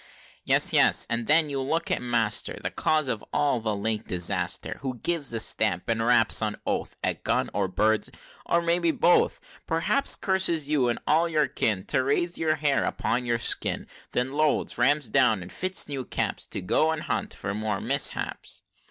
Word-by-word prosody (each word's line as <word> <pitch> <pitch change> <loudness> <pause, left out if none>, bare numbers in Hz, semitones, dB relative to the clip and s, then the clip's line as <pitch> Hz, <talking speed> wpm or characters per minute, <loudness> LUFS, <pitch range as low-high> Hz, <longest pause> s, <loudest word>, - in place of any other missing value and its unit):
"Yes! - - +3
yes! - - +4
and 115 0 -1
then 155 +1 +4
you 140 -2 -3
look 160 +5 -2
at - - +1
master, 115 -3 0
The - - -2
cause 155 -2 0
of 115 -4 -3
all 145 -4 +1
the 110 -2 -2
late 110 +2 -3
disaster, 90 -1 0
Who 130 -3 -4
gives 160 0 -1
a 115 - -2
stamp, 105 -4 0
and 115 -1 0
raps 115 -2 +3
on 105 -1 -1
oath - - -3
At - - -1
gun, - - 0
or 100 -1 0
birds, 105 +4 0 0.3
or 170 0 +1
maybe 170 0 +1
both; 175 +2 +2 0.3
P'rhaps 165 +12 +1
curses 190 -6 +1
you, 140 -5 +1
and 120 - -1
all 165 +3 +2
your 155 -2 +1
kin, 100 -3 -1
To - - +2
raise 145 +6 0
the 155 -2 +1
hair 150 -3 +1
upon 125 +1 -2
your 120 0 +1
skin! 115 - -1 0.3
Then 125 +2 -1
loads, 155 -4 0
rams 140 +2 +2
down, 110 -3 +2
and 90 - -11
fits 185 0 +1
new 140 -3 -4
caps, - - -3
To - - -5
go 155 - +1
and 160 -1 -2
hunt - - -3
for 100 - -4
more 110 +1 -2
miss - - +2
haps!" - - -4
130 Hz, 190 wpm, -26 LUFS, 110-155 Hz, 0.3 s, yes